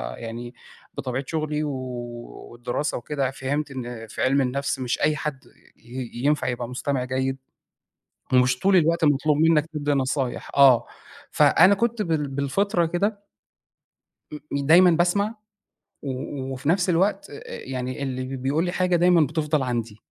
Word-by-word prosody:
يعني، 120 Hz, +1 st, -7 dB, 0.4 s
بطبيعة 130 Hz, +1 st, -3 dB
شُغلي 155 Hz, -1 st, -2 dB
و 150 Hz, -, -2 dB, 0.8 s
والدراسة 120 Hz, +5 st, -3 dB
وكده 135 Hz, +1 st, -2 dB
فِهمت 140 Hz, +2 st, -3 dB
إن 120 Hz, -3 st, -6 dB
في 110 Hz, -, -6 dB
عِلم 135 Hz, +2 st, +3 dB
النَفْس 135 Hz, +1 st, -1 dB
مش 125 Hz, -1 st, -2 dB
أي 150 Hz, +1 st, +3 dB
حَد 150 Hz, -3 st, -4 dB, 0.3 s
ي 120 Hz, +1 st, -8 dB
ينفع 145 Hz, +5 st, 0 dB
يبقى 120 Hz, -1 st, -3 dB
مستمع 130 Hz, +1 st, -2 dB
جيد، 130 Hz, +1 st, -1 dB, 1.0 s
ومش 125 Hz, 0 st, +4 dB
طول 195 Hz, +4 st, +3 dB
الوقت 170 Hz, -1 st, +3 dB
مطلوب 145 Hz, 0 st, +3 dB
منك 160 Hz, -1 st, +4 dB
تدّي 150 Hz, -2 st, -2 dB
نصايح. 135 Hz, -2 st, -1 dB
آه، 135 Hz, -4 st, +6 dB, 0.4 s
فأنا 185 Hz, +4 st, +5 dB
كُنت 235 Hz, +1 st, 0 dB
بال 160 Hz, -5 st, -1 dB
بالفطرة 165 Hz, +7 st, 0 dB
كده 200 Hz, +5 st, -2 dB, 1.3 s
دايمًا 165 Hz, +6 st, +5 dB
باسمع 180 Hz, +6 st, +1 dB, 0.7 s
و 135 Hz, 0 st, -5 dB
وفي 130 Hz, +2 st, -5 dB
نفس 180 Hz, +2 st, +2 dB
الوقت، 195 Hz, +4 st, +1 dB, 0.2 s
يعني 130 Hz, 0 st, -5 dB
اللي 130 Hz, 0 st, -4 dB
بيقول 135 Hz, +6 st, 0 dB
لي 175 Hz, -, -2 dB
حاجة 180 Hz, -1 st, +1 dB
دايمًا 175 Hz, 0 st, +4 dB
بتفضل 150 Hz, 0 st, -1 dB
عندي. 115 Hz, -4 st, -3 dB
140 Hz, 135 wpm, -24 LUFS, 130-165 Hz, 1.3 s, آه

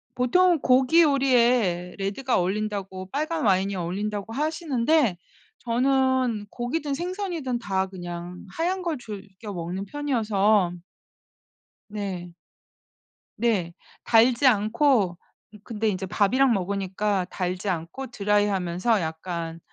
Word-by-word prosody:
보통은 345 Hz, +8 st, +3 dB
고기 265 Hz, +6 st, +5 dB
요리에 240 Hz, -, +2 dB
레드가 210 Hz, +7 st, -1 dB
어울린다고 190 Hz, -1 st, -3 dB
빨간 310 Hz, 0 st, -1 dB
와인이 195 Hz, 0 st, +2 dB
어울린다고 200 Hz, +4 st, -3 dB
하시는데 300 Hz, -, +1 dB, 0.4 s
저는 255 Hz, -2 st, +1 dB
고기든 280 Hz, +6 st, -3 dB
생선이든 345 Hz, -6 st, -3 dB
다 190 Hz, -4 st, -1 dB
그냥 175 Hz, -1 st, -7 dB
하얀 355 Hz, -, -1 dB
걸 340 Hz, -4 st, -2 dB
즐겨 205 Hz, -2 st, -9 dB
먹는 180 Hz, +3 st, -4 dB
편이어서 215 Hz, -8 st, +1 dB, 1.2 s
네. 190 Hz, -4 st, -5 dB, 1.1 s
네. 200 Hz, -8 st, +1 dB, 0.3 s
달지 240 Hz, +3 st, +4 dB
않고 215 Hz, -3 st, +3 dB, 0.4 s
으 -, -, -11 dB
근데 220 Hz, -1 st, -2 dB
인제 190 Hz, -1 st, -3 dB
밥이랑 240 Hz, +7 st, +3 dB
먹으니까 195 Hz, 0 st, -1 dB
달지 180 Hz, +2 st, -3 dB
않고 175 Hz, +10 st, -4 dB
드라이하면서 205 Hz, -2 st, +1 dB
약간 165 Hz, 0 st, -4 dB
210 Hz, 250 characters per minute, -25 LUFS, 190-260 Hz, 1.2 s, 고기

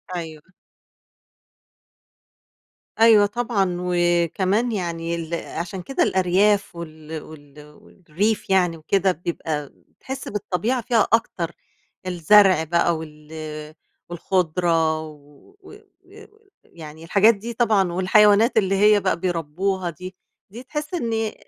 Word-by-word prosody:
أيوه. 160 Hz, -3 st, -7 dB, 2.6 s
أيوه 225 Hz, -2 st, +6 dB
طبعًا. 205 Hz, -5 st, -1 dB
وكمان 180 Hz, +5 st, 0 dB
يعني 170 Hz, -4 st, -3 dB
ال 165 Hz, 0 st, -6 dB
عشان 170 Hz, +2 st, -5 dB
كده 270 Hz, -, -1 dB
الأرياف 190 Hz, +2 st, +1 dB
وال 160 Hz, -2 st, -8 dB
وال 145 Hz, -2 st, -14 dB, 0.2 s
والريف 195 Hz, +6 st, -3 dB
يعني 180 Hz, -3 st, +2 dB
وكده، 190 Hz, +4 st, +1 dB
بيبقى 155 Hz, -4 st, -5 dB, 0.3 s
تحس 265 Hz, 0 st, -7 dB
بالطبيعة 210 Hz, +4 st, -2 dB
فيها 230 Hz, -3 st, +1 dB
أكتر. 175 Hz, -7 st, 0 dB, 0.6 s
الزرع 185 Hz, 0 st, +4 dB
بقى 170 Hz, +1 st, +1 dB
وال 150 Hz, -1 st, -11 dB, 0.8 s
والخضرة 165 Hz, -2 st, 0 dB
و 150 Hz, -, -15 dB, 1.1 s
ويعني 160 Hz, -1 st, -12 dB
الحاجات 205 Hz, +6 st, +4 dB
دي 230 Hz, +4 st, -7 dB
طبعًا 215 Hz, -6 st, +2 dB
والحيوانات 205 Hz, +5 st, +4 dB
اللي 195 Hz, -2 st, +2 dB
هي 210 Hz, +1 st, +5 dB
بقى 190 Hz, -2 st, -1 dB
بيربّوها 180 Hz, +2 st, -2 dB
دي، 180 Hz, +3 st, -9 dB, 0.3 s
دي 230 Hz, +6 st, -10 dB
تحس 300 Hz, +5 st, -6 dB
إن 235 Hz, -10 st, -2 dB
أ 220 Hz, -1 st, -2 dB
180 Hz, 105 wpm, -22 LUFS, 165-210 Hz, 2.6 s, أيوه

